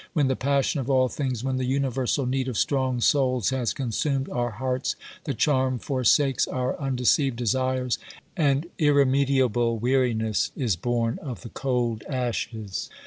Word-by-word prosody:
When 145 -5 +2
the 130 - +1
passion 140 +2 +1
of 130 0 -4
all 130 -1 +3
things, 130 -5 -3
when 130 -1 -1
the 130 - -1
universal 135 0 0
need 130 +1 -1
of 125 -4 -3
strong 130 -3 0
souls, 130 -3 +2
has 130 -3 0
consumed 135 +2 -1
our 120 0 -1
hearts, 125 +4 -2 0.3
the 140 - -2
charm 130 0 +2
forsakes 135 +1 +2
our 130 -1 -2
undeceived 135 0 +1
desires, 130 +1 0 0.4
and 145 -3 +2
irremediable 135 -5 +3
weariness 115 -3 +1
is 120 -9 +1
born 115 +4 -1
of 130 -6 -7
the 115 - -9
cold 120 -4 -1
ashes. 115 -5 -3
130 Hz, 145 wpm, -25 LUFS, 120-135 Hz, 0.4 s, all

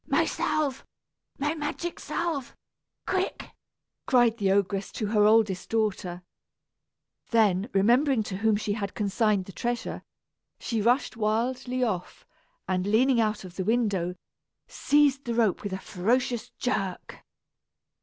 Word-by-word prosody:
"My - - +3
salve, 285 -4 -1 0.5
my 295 +2 0
magic 325 +2 -4
salve, 325 -7 -3 0.5
quick!" 375 0 -2 0.6
cried 240 -3 +4
the 195 -2 +2
ogress 195 0 0
to 215 - -3
her 210 0 +3
oldest 210 -4 +3
daughter. 195 -5 -1 1.1
Then, 210 -2 +2
remembering 240 +5 +3
to 190 -2 -5
whom 220 +1 +2
she 205 0 -1
had 200 -2 -4
consigned 210 -2 +1
the 195 - -10
treasure, 240 +5 -3 0.6
she 225 -3 -2
rushed 245 +2 +1
wildly 245 +4 0
off 190 -7 -3 0.4
and, 185 0 0
leaning 235 +3 +4
out 215 -2 -1
of 185 -1 -11
the 190 - -1
window, 200 -5 0 0.5
seized 285 -2 +2
the 235 -1 -2
rope 225 -5 +2
with 205 - -5
a 190 - -2
ferocious 235 +6 -1
jerk. 195 -7 -4
220 Hz, 130 wpm, -27 LUFS, 200-250 Hz, 1.1 s, cried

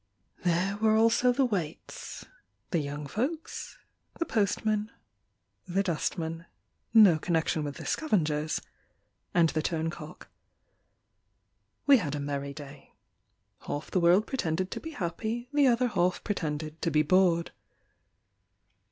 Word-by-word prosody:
There 180 +3 +1
were 215 0 +3
also 230 +3 +4
the 265 +2 +2
waits, 180 -9 -5 0.5
The 170 - +2
young 145 0 -4
folks, 265 - -4 0.4
The 335 - -1
postman, 215 - 0 0.8
The 190 +2 +1
dustman 165 -1 -2 0.4
(No 205 -8 +7
connection 160 -1 0
with 145 -1 -4
the - - -8
scavengers), 155 - 0 0.7
And 170 -2 +5
the 155 - -1
turncock. 165 +1 -4 1.6
We 280 -2 +8
had 150 - -2
a - - -3
merry 140 0 -3
day. 140 -1 -12 0.7
Half 145 - -4
the 185 - +2
world 180 +5 +5
pretended 185 - -2
to - - -4
be 325 - -7
happy, 225 - -4
The 290 -2 +5
other 245 0 +3
half 180 -3 0
pretended 155 -5 -3
to 165 - +1
be 155 -1 +3
bored. 175 0 +3
175 Hz, 125 wpm, -29 LUFS, 155-220 Hz, 1.6 s, We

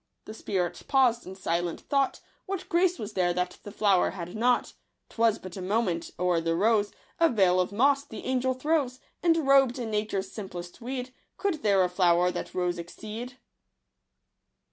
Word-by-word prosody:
The 215 - -8
spirit 180 -5 -2
paused 255 -5 +3
in 190 - -7
silent 175 -2 -2
thought, 275 -2 0
— - - -40
What 390 -2 -4
grace 355 +1 +2
was 210 -1 -6
there 180 -2 +1
that 180 0 -1
flower 200 -2 +1
had 175 -1 -7
not? 245 +2 +1 0.4
'Twas 225 -1 +2
but 185 -1 -10
a 190 - -6
moment 185 -3 -1
— - - -39
o'er 180 -2 +2
the 165 0 0
rose 205 +2 +2 0.3
A 335 -1 +5
veil 190 -6 +3
of 180 - 0
moss 275 +6 +3
the 220 -7 -9
Angel 260 0 0
throws; 270 -2 0 0.2
And 330 -3 +3
robed 270 -2 +5
in 235 -3 -4
nature's 210 -2 -2
simplest 180 -3 -8
weed, 255 +1 -5 0.2
Could 385 -7 -1
there 200 -3 +4
a - - +2
flower 180 -1 +3
that - - -6
rose 180 -1 0
exceed 220 +8 -7
215 Hz, 175 wpm, -28 LUFS, 180-255 Hz, 0.4 s, A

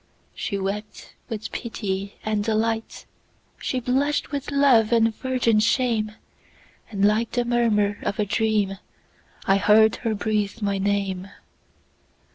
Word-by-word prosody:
She 200 - -3
wept 200 +2 -5 0.2
with 220 -2 -5
pity 200 -4 -4
and 215 -1 0
delight, 225 +1 -1 0.5
She 255 - -2
blush'd 270 +4 0
with 280 -2 -4
love 270 -6 +4
and 225 -1 +3
virgin 250 -4 +1
shame; 220 -1 +1 0.8
And 200 -2 +1
like 215 +2 +1
the 245 -1 +1
murmur 220 -4 +1
of 200 - -2
a 210 - +1
dream,I 205 -2 -2
heard 215 +2 +5
her 225 -3 -2
breathe 210 0 -1
my 200 -2 -1
name. 195 -1 -1
215 Hz, 120 wpm, -24 LUFS, 205-235 Hz, 0.8 s, heard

